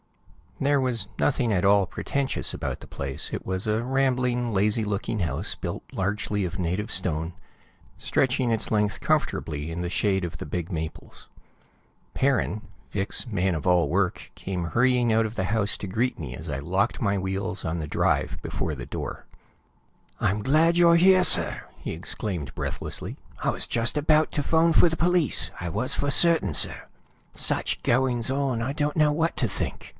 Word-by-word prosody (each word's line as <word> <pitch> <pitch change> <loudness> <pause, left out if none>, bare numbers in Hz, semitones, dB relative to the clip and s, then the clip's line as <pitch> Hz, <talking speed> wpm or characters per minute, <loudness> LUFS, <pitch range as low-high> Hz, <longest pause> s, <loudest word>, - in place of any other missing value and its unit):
There 140 0 +2
was 120 -6 -1
nothing 125 -5 +1
at 95 -2 +1
all 100 -1 +4
pretentious 140 +8 -1
about - - -4
the - - -11
place; 70 -1 -4
it - - -4
was 95 0 -2
a 110 +1 0
rambling, 125 -2 +1
lazy 105 +2 +2
looking 105 +1 -2
house 85 - -2
built - - -5
largely 105 +1 -1
of 90 0 -5
native 90 +5 -2
stone, 85 -2 -1 0.6
stretching 130 -2 +1
its 110 - 0
length 105 -2 +1
comfortably 75 +1 -1
in 85 +1 -4
the 90 - -2
shade 95 0 +1
of 85 -2 -4
the - - -6
big 85 +4 -4
maples. 80 -2 -6 0.8
Perrin, 130 -5 +1 0.3
Vic's 100 0 -2
man 95 -6 0
of 80 - -5
all 90 -4 +3
work, 90 +2 -1
came 90 -3 -4
hurrying 120 +5 +2
out 110 0 +3
of 110 - -4
the 95 - -2
house 105 0 +1
to 100 - -5
greet 115 +7 -1
me 65 -6 -6
as 80 +6 -9
I 70 -1 -3
locked 95 - -1
my 100 -3 +1
wheels 95 0 -3
on 80 +1 -2
the 75 - -4
drive - - 0
before 75 - -3
the 60 -3 -7
door. - - -6 0.9
"I'm 105 +2 0
glad 160 +5 +3
you're 170 -1 +6
here, 185 +2 +6
sir!" - - +4
he - - -6
exclaimed 85 - -5
breathlessly. - - -4 0.3
"I - - +2
was - - +1
just 120 +4 -1
about 155 +1 +3
to 145 - 0
phone 165 +2 +3
for 175 - +6
the 165 - -4
police; 175 -5 +3
I 90 - -3
was 125 +10 -2
for 140 - 0
certain, 165 - +4
sir. - - 0 0.5
Such - - +2
goings 125 -1 +2
on, 135 -3 0
I 130 +4 -2
don't 150 0 -1
know 150 -1 +4
what 165 +2 0
to 120 - +1
think!" 95 - -5
105 Hz, 180 wpm, -25 LUFS, 90-130 Hz, 0.9 s, you're